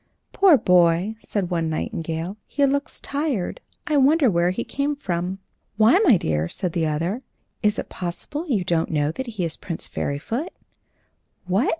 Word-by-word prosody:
"Poor 375 -7 +6
boy!" 180 0 +3
said 195 -6 -3
one 165 -2 0
nightingale, 165 +3 -3
"he 285 - +2
looks 280 +1 -1
tired; 285 - -2 0.2
I 300 - +1
wonder 280 -2 +5
where 170 0 +2
he 190 +6 -2
came 285 +1 -1
from." 180 -7 -3 0.4
"Why, 225 - +6
my 330 - +6
dear," 80 - -1
said 180 -4 -3
the 165 -2 +1
other, 165 +10 -1 0.4
"is 210 -1 +2
it - - -4
possible 190 - -5
you 220 - +1
don't 170 -2 0
know 150 -2 +1
that 265 +9 -5
he 210 -6 -2
is 160 - -3
Prince 165 -3 -5
Fairyfoot?" 225 - -3 0.9
"What!" 190 +8 +2
190 Hz, 165 wpm, -23 LUFS, 170-275 Hz, 0.9 s, Poor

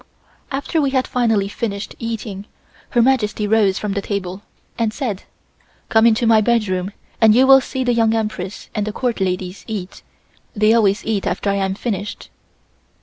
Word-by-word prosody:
After 285 +4 -1
we 280 - +1
had 260 -1 +1
finally 225 -5 +1
finished 200 0 -4
eating, 220 -3 -5 0.4
Her 240 -2 +3
Majesty 225 -5 +1
rose 205 -3 +3
from 210 -2 -3
the 200 - -1
table 195 -2 -4 0.3
and 230 -3 0
said: 215 -5 -4 0.6
"Come 220 +1 +5
into 230 +1 +2
my 225 -1 +5
bedroom 205 -5 0 0.3
and 220 -1 +6
you 255 +2 +6
will 270 0 +7
see 260 0 -3
the 245 -1 +1
Young 225 -1 +2
Empress 210 -3 -4
and 210 -1 -2
the 215 - -3
Court 245 -1 -2
ladies 185 0 -2
eat; 200 -5 -6 0.5
they 215 +1 +4
always 210 -3 +2
eat 215 -3 -1
after 200 - -1
I 200 - 0
am 190 -1 -1
finished." 205 -2 -5
215 Hz, 170 wpm, -19 LUFS, 200-235 Hz, 0.6 s, will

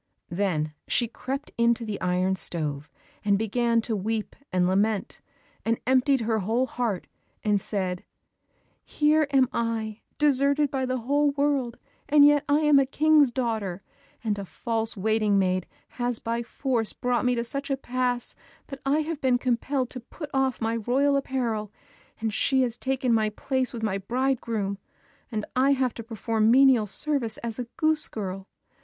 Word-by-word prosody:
Then 170 -5 -1
she 240 - +2
crept 270 +5 -5
into 235 0 +2
the 210 -2 -4
iron 185 +1 +1
stove, 150 -5 -2 0.3
and 200 -1 +3
began 230 +2 +1
to 225 0 -2
weep 215 +2 -3 0.2
and 180 -1 +2
lament, 200 +2 0 0.4
and 230 0 0
emptied 260 +1 +3
her 225 -1 0
whole 225 +6 +1
heart, 230 -6 -2 0.4
and 205 -2 +2
said, 185 -3 -2 0.8
"Here 305 0 +2
am 270 -2 +4
I 225 -2 -2 0.2
deserted 280 0 +2
by 265 -2 -1
the 255 0 -1
whole 285 +4 +2
world, 280 -4 0 0.3
and 290 0 +7
yet 290 0 +5
I 290 +2 +4
am 300 -2 +5
a 275 - +3
King's 300 0 +4
daughter, 220 -7 -2 0.4
and 210 -3 -1
a - - -4
false 225 +2 -2
waiting 215 0 +2
maid 185 -1 +1 0.2
has 245 -1 -2
by 230 +1 -2
force 240 -2 -1
brought 245 -1 0
me 250 0 +2
to 235 - -1
such 275 +5 -4
a 275 - 0
pass 250 -1 -2 0.3
that 275 -2 -8
I 285 +3 +2
have 310 -1 -4
been 255 -2 +3
compelled 255 +1 -1
to 255 - -5
put 290 +5 -9
off 265 -1 +1
my 225 0 -1
royal 265 +6 +2
apparel, 235 -6 -1 0.5
and 220 -1 -2
she 265 +4 +2
has 240 -2 -1
taken 260 -1 0
my 215 -1 +2
place 260 +4 -1
with 230 -2 -6
my 195 -3 0
bridegroom, 230 -3 -1 0.5
and 215 -2 -2
I 270 +2 +4
have 255 -3 0
to 230 - -7
perform 225 -1 0
menial 255 -3 +5
service 270 +1 0
as 230 0 -3
a 245 - -2
goose 310 0 +2
girl. 195 -2 -5
235 Hz, 165 wpm, -26 LUFS, 215-270 Hz, 0.8 s, and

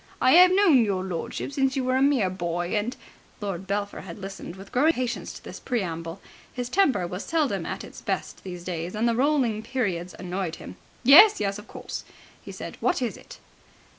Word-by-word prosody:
I 255 - +5
'ave 365 0 +4
known 340 - +6
your 195 -3 -1
lordship 180 +7 -4
since 270 -1 +1
you 265 - 0
were 255 0 +1
a 260 - +2
mere 265 -9 +3
boy, 175 -1 -3
and.. 215 +5 -1 0.2
." - - -31
Lord 195 -3 -4
Belpher 200 +1 -2
had 170 -3 -9
listened 195 -3 -8
with 195 +1 -12
growing 255 +5 +3
impatience 250 -3 -3
to - - -12
this - - -9
preamble. 170 -7 -3 0.3
His 245 -1 -4
temper 285 - +2
was 180 +2 -5
seldom 320 -4 0
at - - -4
its - - -11
best - - -4
these 180 -2 -7
days, 175 +1 -4
and 225 +3 +1
the 235 - +2
rolling 250 -4 +1
periods 200 -8 -2
annoyed 180 -2 -3
him. - - -10 0.3
"Yes, 365 - +9
yes, 200 0 -1
of 210 - -13
course," - - -7 0.4
he - - -9
said. - - -8
"What 360 - +2
is 240 - -2
it?" - - -13
210 Hz, 200 wpm, -26 LUFS, 185-260 Hz, 0.4 s, Yes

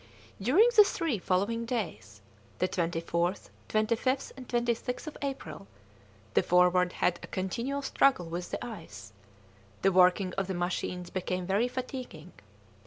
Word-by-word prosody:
During 305 - +5
the 420 - +10
three 330 - -1
following 200 +6 0
days, 240 -1 -4 0.4
the 185 - +1
24th, 170 0 -1 0.2
25th, 230 +5 0
and 255 -2 -11
26th 240 +2 -1
of 310 - -7
April, 160 - -5 0.7
the - - +4
Forward 180 0 +3
had 175 -1 +1
a - - -8
continual 235 +10 -3
struggle 270 -9 +3
with 170 +2 -5
the - - -4
ice; 110 - -9 0.7
the 195 - +5
working 185 0 +4
of 195 - -1
the 190 - -3
machines 175 0 -3
became 185 -1 -2
very 200 +6 +2
fatiguing. 250 - -6
190 Hz, 135 wpm, -30 LUFS, 180-250 Hz, 0.7 s, the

